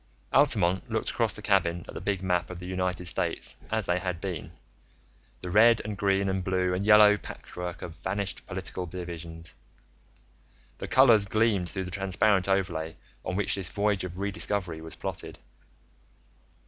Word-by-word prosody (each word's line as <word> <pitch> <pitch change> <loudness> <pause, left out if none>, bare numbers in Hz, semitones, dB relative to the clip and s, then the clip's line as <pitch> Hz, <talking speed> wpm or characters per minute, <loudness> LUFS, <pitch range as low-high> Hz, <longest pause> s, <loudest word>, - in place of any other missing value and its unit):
Altamont 90 +2 +3
looked - - 0
across - - 0
the - - -8
cabin 85 0 +1
at - - -9
the - - -6
big 100 -2 -2
map 90 -2 0
of 90 - -7
the 90 - -8
United 90 0 -2
States 85 - -1
as 110 -2 -1
they 90 +1 +1
had 90 -2 -3
been, 90 -3 -5 0.9
the 90 - -5
red 115 +4 +6
and 105 -1 -3
green 100 0 +1
and 95 -1 -1
blue 90 -1 0
and 95 +3 -2
yellow 105 -1 +8
patchwork 90 -2 -7
of 80 - -7
vanished 95 +1 -3
political 90 -1 -4
divisions. 85 -1 -7 1.3
The - - -5
colors 115 -6 +6
gleamed 105 -4 +1
through 95 - -3
the 90 - -7
transparent 95 +1 +1
overlay 85 -5 0 0.3
on 90 - -3
which 100 0 +2
this 95 -3 +2
voyage 100 -2 0
of 90 -1 -6
re 100 +1 -2
discovery 95 -5 -2
was 80 0 -7
plotted. - - -5
95 Hz, 165 wpm, -28 LUFS, 90-100 Hz, 1.3 s, yellow